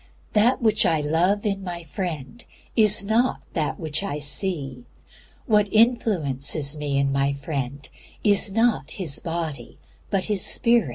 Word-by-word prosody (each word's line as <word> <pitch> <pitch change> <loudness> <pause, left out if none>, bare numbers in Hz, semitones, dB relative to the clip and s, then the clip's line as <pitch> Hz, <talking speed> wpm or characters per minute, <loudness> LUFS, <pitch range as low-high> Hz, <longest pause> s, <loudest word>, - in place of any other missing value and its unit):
That 235 +4 +3
which 220 -1 +3
I 160 -2 +2
love 170 +8 +1
in 195 -2 -1
my 175 -2 -6
friend 165 - -5 0.3
is 210 -3 +4
not 230 +5 +1
that 155 -4 -2
which 155 0 -3
I 195 -7 -3
see. 145 -4 -2 0.6
What 210 -4 +2
influences 155 - +1
me 145 -2 -2
in 140 0 +1
my 140 0 +1
friend 140 -2 -5 0.4
is 205 -1 +4
not 225 -8 +1
his 165 -8 0
body 160 -7 -5 0.3
but 195 -2 0
his 205 -4 0
spirit. 235 - +3
170 Hz, 140 wpm, -24 LUFS, 145-210 Hz, 0.6 s, is